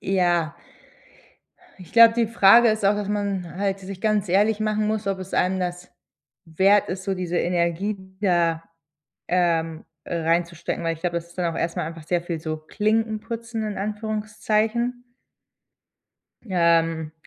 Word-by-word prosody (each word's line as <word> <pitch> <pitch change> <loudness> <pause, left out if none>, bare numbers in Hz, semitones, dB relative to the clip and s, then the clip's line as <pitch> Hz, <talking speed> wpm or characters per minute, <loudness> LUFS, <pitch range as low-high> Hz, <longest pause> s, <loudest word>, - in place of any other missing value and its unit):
Ja. 175 -5 +1 1.3
Ich 180 - -13
glaube, 230 -1 +8
die 235 -1 +2
Frage 230 +1 +6
ist 215 -1 -2
auch, 205 +1 +4
dass 205 -1 -3
man 200 -4 -2
halt 195 0 -1
sich 195 0 -9
ganz 210 -3 +1
ehrlich 205 +4 +3
machen 215 0 0
muss, 215 -1 -2
ob 195 -1 -1
es 185 0 -9
einem 185 +1 +1
das 180 0 -5 0.5
wert 190 +5 +3
ist, 185 +1 -5
so 195 - -1
diese 180 -2 -2
Energie 175 +4 0 0.2
da, 170 -4 +1 0.6
ähm, 165 -2 0 0.2
äh, - - -4
reinzustecken, 170 +1 -1
weil 165 0 0
ich 160 - -13
glaube, 170 -1 -1
das 170 - -7
ist 170 - -20
dann 170 -2 -1
auch - - -4
erstmal 165 -2 -2
einfach 165 -1 -9
sehr 175 +2 0
viel 170 -1 -4
so 155 0 -3
Klinken 215 +7 -1
putzen 230 0 -5
in 205 - -6
Anführungszeichen. 215 +3 -2 1.4
Ähm, 165 -4 +1
190 Hz, 155 wpm, -23 LUFS, 170-215 Hz, 1.4 s, glaube